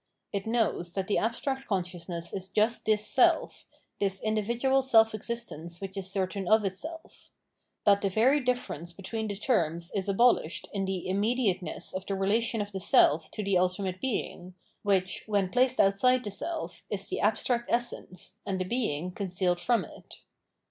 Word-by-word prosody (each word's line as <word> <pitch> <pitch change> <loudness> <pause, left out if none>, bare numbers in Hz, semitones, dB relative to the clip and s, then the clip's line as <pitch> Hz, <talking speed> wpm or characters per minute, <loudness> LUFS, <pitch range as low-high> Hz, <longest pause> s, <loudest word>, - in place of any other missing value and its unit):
It 200 +1 -2
knows 220 -7 0
that 195 -1 -2
the 205 - +1
abstract 265 +4 -2
consciousness 175 -3 -3
is 190 0 -5
just 215 +4 +1
this 215 -1 +2
self, 255 +4 +2 0.3
this 195 -1 0
individual 235 +5 +1
self 225 -4 +5
existence 195 -7 -5
which 195 -1 -7
is 190 -1 -1
certain 190 0 -2
of 215 0 +4
itself: 315 - -7 0.5
that 200 -1 +5
the 195 - +1
very 245 +9 +4
difference 245 - -2
between 215 +4 -4
the 205 - -3
terms 170 - 0
is 200 -1 -2
abolished 200 -5 +2
in 195 -1 -1
the 190 -2 -3
imm^iateness 200 -1 0
of 185 +1 -5
the 195 - -1
relation 220 +3 +1
of 205 - -10
the 195 - -4
self 160 -3 +4
to 210 - -5
the 195 -2 +2
ultimate 185 0 -1
Being, 185 -7 -3 0.3
which, 190 -3 0
when 200 -3 +1
placed 255 +1 +2
outside 250 +6 +4
the 205 - -4
self, 330 - -5
is - - -2
the - - -3
abstract 240 -1 +1
essence, 205 -5 -2
and 190 -1 -2
a 185 - -1
Being 180 - -1
concealed 180 -2 -1
from 240 +4 +1
it. - - -13
200 Hz, 165 wpm, -29 LUFS, 185-235 Hz, 0.5 s, self